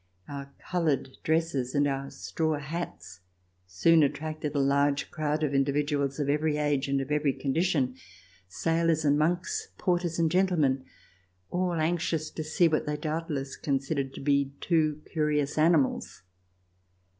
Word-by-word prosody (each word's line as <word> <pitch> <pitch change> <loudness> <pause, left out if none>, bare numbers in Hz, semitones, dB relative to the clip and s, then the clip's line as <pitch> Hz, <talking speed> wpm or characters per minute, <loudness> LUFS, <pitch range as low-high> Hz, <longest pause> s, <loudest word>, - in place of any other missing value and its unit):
Our 140 -1 -7
colored 155 -7 -1
dresses 160 -6 0
and 145 0 +3
our 135 0 -2
straw 160 -2 -2
hats 145 - -6 0.5
soon 160 - +4
attracted 150 +1 -1
a - - +2
large 140 +1 +2
crowd 155 0 -1
of 145 -2 0
individuals 140 0 +1
of 145 - 0
every 150 +1 +1
age 145 -2 +1
and 140 0 +1
of 135 +2 -6
every 150 -2 +2
condition: 140 -3 0 0.5
sailors 165 - +1
and 145 0 +4
monks, 170 +4 0
porters 175 -2 0
and 165 -2 +2
gentlemen 160 -8 +2 0.3
— 90 0 -40
all 180 0 0
anxious 160 -1 0
to 155 - -4
see 160 +3 +3
what 155 -2 0
they 150 0 -1
doubtless 150 -3 -3
considered 135 -1 -2
to - - -7
be 140 -1 +1
two 155 -3 +1
curious 150 -2 0
animals. 155 - +2
150 Hz, 145 wpm, -28 LUFS, 140-160 Hz, 0.5 s, soon